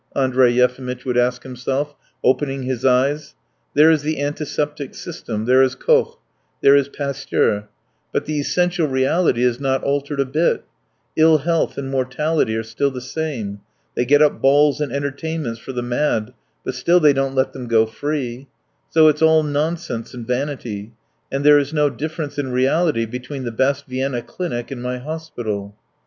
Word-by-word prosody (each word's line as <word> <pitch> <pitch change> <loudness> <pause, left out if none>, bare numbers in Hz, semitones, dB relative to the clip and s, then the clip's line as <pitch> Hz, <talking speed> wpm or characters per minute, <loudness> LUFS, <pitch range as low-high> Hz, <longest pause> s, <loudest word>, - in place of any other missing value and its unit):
Andrey 130 -2 +3
Yefimitch 125 +1 0
would 125 -2 -1
ask 125 0 +1
himself, 135 +3 -3 0.3
opening 135 +1 +1
his 130 -1 -3
eyes. 140 +4 +1 0.4
"There 155 +3 +7
is 155 -2 +2
the 155 0 -2
antiseptic 145 0 -3
system, 110 +1 -5
there 130 +2 +5
is 130 -1 +2
Koch, - - +2 0.4
there 140 - +7
is 140 -1 +3
Pasteur, 140 -7 -1 0.4
but - - -1
the 150 -1 -2
essential 175 +2 +1
reality 130 0 +2
is 125 -1 +1
not 135 -1 0
altered 140 0 -1
a 140 - +3
bit; 155 +6 +1 0.5
ill 160 0 +6
health 165 +3 0
and 135 -1 -4
mortality 135 0 0
are 110 - -2
still 140 +5 -1
the 130 -2 -6
same. 125 -7 -4 0.3
They - - 0
get 145 +4 +5
up 150 - +1
balls 145 +2 +4
and 145 -4 -2
entertainments 140 -2 -3
for 130 - -8
the 125 -1 -3
mad, 120 -2 -1 0.3
but - - -2
still 170 +8 +3
they 150 -3 +5
don't 135 0 -1
let 130 0 +1
them 125 -2 -7
go 115 -1 +4
free; 130 +1 -4 0.4
so 160 -1 +6
it's 150 0 +2
all 160 -1 +5
nonsense 150 -5 -2
and 120 -2 -7
vanity, 125 -5 -3 0.4
and 135 +1 -1
there 150 0 +8
is 145 +2 -3
no 150 -1 +3
difference 155 +2 -5
in 135 -3 -2
reality 130 0 +2
between 130 +4 -6
the 120 - -3
best 140 +4 0
Vienna 130 -1 -2
clinic 120 -7 -5
and 130 -3 -5
my 125 0 -3
hospital." 120 -9 -5
135 Hz, 170 wpm, -20 LUFS, 125-150 Hz, 0.5 s, there